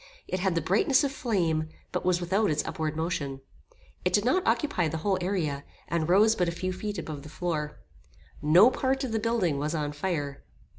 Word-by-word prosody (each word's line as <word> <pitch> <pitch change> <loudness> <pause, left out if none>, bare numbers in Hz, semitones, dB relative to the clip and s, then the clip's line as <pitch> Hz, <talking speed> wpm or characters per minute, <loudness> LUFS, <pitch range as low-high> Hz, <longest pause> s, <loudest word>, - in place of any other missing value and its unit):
It 185 - -2
had 190 -2 0
the 165 - +1
brightness 280 - +3
of 280 - 0
flame, 170 - 0 0.2
but - - -2
was 180 -1 +2
without 195 +4 +1
its 150 0 0
upward 155 -1 -3
motion. 150 -4 -2 0.6
It 180 - 0
did 205 +2 +3
not 370 +10 +3
occupy 230 - +1
the 160 +1 -3
whole 195 -2 +2
area, 165 -7 -1 0.2
and 170 -1 -1
rose 210 +5 +6
but 180 -4 +1
a - - -2
few 185 +2 -3
feet 205 +2 -4
above 155 -3 -5
the 150 - -11
floor. 150 -2 -3 0.6
No 175 - +6
part 265 +1 0
of 255 - -3
the 220 - 0
building 210 -10 0
was 150 +3 -1
on 150 -2 -1
fire. 145 -3 -3
175 Hz, 200 wpm, -28 LUFS, 155-210 Hz, 0.6 s, rose